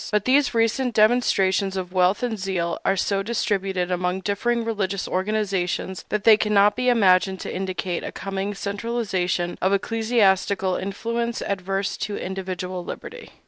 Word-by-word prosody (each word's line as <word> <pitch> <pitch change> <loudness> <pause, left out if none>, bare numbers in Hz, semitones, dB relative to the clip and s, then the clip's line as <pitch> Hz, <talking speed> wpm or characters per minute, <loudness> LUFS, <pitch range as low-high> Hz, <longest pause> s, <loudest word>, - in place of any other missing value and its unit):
But 210 -1 +1
these 270 -1 +3
recent 230 +2 +1
demonstrations 200 -4 +3
of 180 -1 -5
wealth 185 +4 +2
and 225 -4 -2
zeal 180 -3 -2
are 195 - +2
so 195 +2 0
distributed 195 -4 -1
among 180 +1 -1
differing 230 +5 -1
religious 200 -3 -2
organizations 190 -2 -2
that 210 -1 -1
they 220 -2 +7
cannot 210 -1 +3
be 250 0 +1
imagined 190 -4 +3
to - - -5
indicate 185 -1 -3
a - - -5
coming 195 +1 -4
centralization 200 -4 -2
of 190 +1 +2
ecclesiastical 200 -3 +1
influence 230 +4 -3
adverse 195 0 -2
to 205 - -3
individual 185 -1 -4
liberty. 480 - -9
195 Hz, 140 wpm, -23 LUFS, 185-220 Hz, -, they